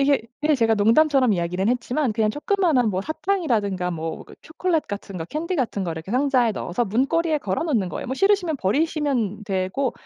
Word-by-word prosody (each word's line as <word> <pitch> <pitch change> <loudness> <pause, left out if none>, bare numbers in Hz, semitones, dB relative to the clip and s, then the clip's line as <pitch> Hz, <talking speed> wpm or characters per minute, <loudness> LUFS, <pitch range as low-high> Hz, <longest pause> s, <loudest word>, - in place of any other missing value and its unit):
이게 280 -2 +3 0.2
예 305 0 +4
제가 230 -4 +3
농담처럼 255 +4 +4
이야기는 180 +2 -1
했지만 250 +1 0
그냥 215 -1 +1
조그마한 300 - +1
뭐 190 -2 -1
사탕이라든가 240 - -1
뭐 165 -1 -5
그 - - -15
초콜릿 320 0 -1
같은 200 -2 -6
거 160 - -4
캔디 335 - -3
같은 235 -7 -1
걸 170 -3 -3
이렇게 165 +7 -7
상자에 255 -3 +2
넣어서 195 +3 -2
문고리에 295 - +1
걸어 195 - -2
놓는 230 - 0
거예요. - - -5
뭐 260 - -2
싫으시면 385 -3 +2
버리시면 250 - 0
되고 195 +6 -1
245 Hz, 435 characters per minute, -23 LUFS, 200-305 Hz, 0.2 s, 예